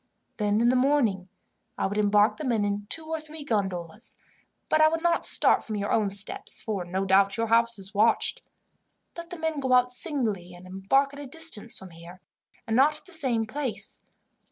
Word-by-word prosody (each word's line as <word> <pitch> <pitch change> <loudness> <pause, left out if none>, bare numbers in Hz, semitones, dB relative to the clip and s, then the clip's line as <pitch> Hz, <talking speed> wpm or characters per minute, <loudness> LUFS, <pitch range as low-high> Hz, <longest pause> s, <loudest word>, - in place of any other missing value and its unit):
Then, 210 0 +1
in 240 - +4
the 255 - +2
morning, 250 -9 +1 0.5
I - - -1
would 205 +2 -2
embark 210 +1 +3
the 310 - -6
men 230 -6 0
in 205 0 -3
two 320 - +1
or 320 0 -4
three 310 0 -9
gondolas, 200 - -4 0.5
but 310 - +2
I 310 - +7
would 325 +1 -2
not 340 -1 +1
start - - +4
from 215 - -5
your 205 0 -3
own 215 -3 +1
steps, 200 +1 -1
for 205 -5 -4
no 185 +2 -3
doubt 195 +2 +3
your 230 -1 -1
house 235 0 +2
is 195 +1 -10
watched. 215 +3 +1 0.7
Let 340 0 -8
the 350 - -7
men 320 -2 -2
go 260 -2 0
out 250 0 +4
singly, 220 - -3
and 175 +1 -14
embark 195 +10 0
at 285 - -10
a 290 - -8
distance 275 -7 0
from 190 -2 -9
here, 170 +2 -13 0.5
and 225 -1 -2
not 295 +4 +4
at - - -17
the 370 - -5
same 255 -8 +3
place. 260 +1 -5
225 Hz, 205 wpm, -26 LUFS, 200-285 Hz, 0.7 s, I